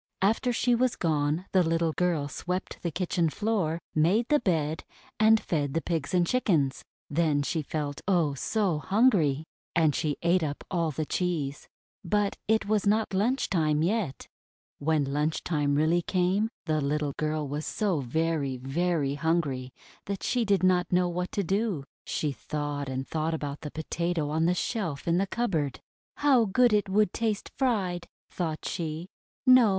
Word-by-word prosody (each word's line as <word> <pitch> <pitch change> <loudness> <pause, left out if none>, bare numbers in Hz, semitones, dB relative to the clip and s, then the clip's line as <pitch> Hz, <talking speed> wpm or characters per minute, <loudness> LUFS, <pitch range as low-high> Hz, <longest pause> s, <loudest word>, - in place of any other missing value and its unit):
After 225 +5 +2
she 245 +1 +2
was 245 +1 +2
gone 155 +1 0
the 190 - +4
little 165 -1 +1
girl 170 -5 0
swept 180 +5 -4
the 170 - -1
kitchen 170 0 0
floor, 195 -4 0 0.2
made 185 +10 +3
the 300 -1 +4
bed, 160 -7 0 0.4
and 220 +1 +6
fed 145 -7 -2
the - - +3
Pigs 160 -5 -2
and 175 -1 +4
Chickens. 165 - +1 0.2
Then 150 -2 +1
she 160 +3 -1
felt, 145 -1 -4
oh! 170 -7 +2
so 185 - 0
hungry! 185 - +3 0.3
And 160 -3 +4
she 150 0 -1
ate 175 +2 +3
up 150 -2 -3
all 170 -3 +1
the 155 +1 -3
cheese. 155 -5 -2 0.4
But 205 +2 +1
it 220 -1 +2
was 210 0 +1
not 215 0 +2
lunch 235 +8 +1
time 155 -3 +1
yet. 185 -6 -1 0.5
When 155 0 +2
lunch 150 +3 -1
time 145 -4 +1
really 160 +4 +3
came, 185 +5 +1 0.2
the 155 -2 +1
little 145 0 -1
girl 155 -1 -1
was 145 +3 -4
so 200 -7 0
very, 140 0 -1
very 145 +2 0
hungry 145 -4 -1 0.4
that 200 -1 -4
she 245 -2 +1
did 200 -2 +2
not 180 -1 +3
know 180 0 +3
what 180 +1 -3
to 200 - 0
do. 195 -4 0 0.2
She 150 - -1
thought 145 0 -4
and 130 0 -3
thought 160 +1 -1
about 145 -2 -5
the 150 - -5
Potato 160 0 -2
on 160 +1 +1
the 180 - +2
shelf 175 - -3
in 170 +1 +3
the 195 - +1
cupboard. 165 - -1 0.4
"How 270 -5 +4
good 240 +3 +3
it 210 -1 +2
would 205 -1 +2
taste 220 -3 -2
fried!' 195 -10 0 0.2
thought 160 -3 -3
she. 165 +1 -3 0.4
:'No! 255 -4 +7
170 Hz, 165 wpm, -28 LUFS, 150-200 Hz, 0.5 s, No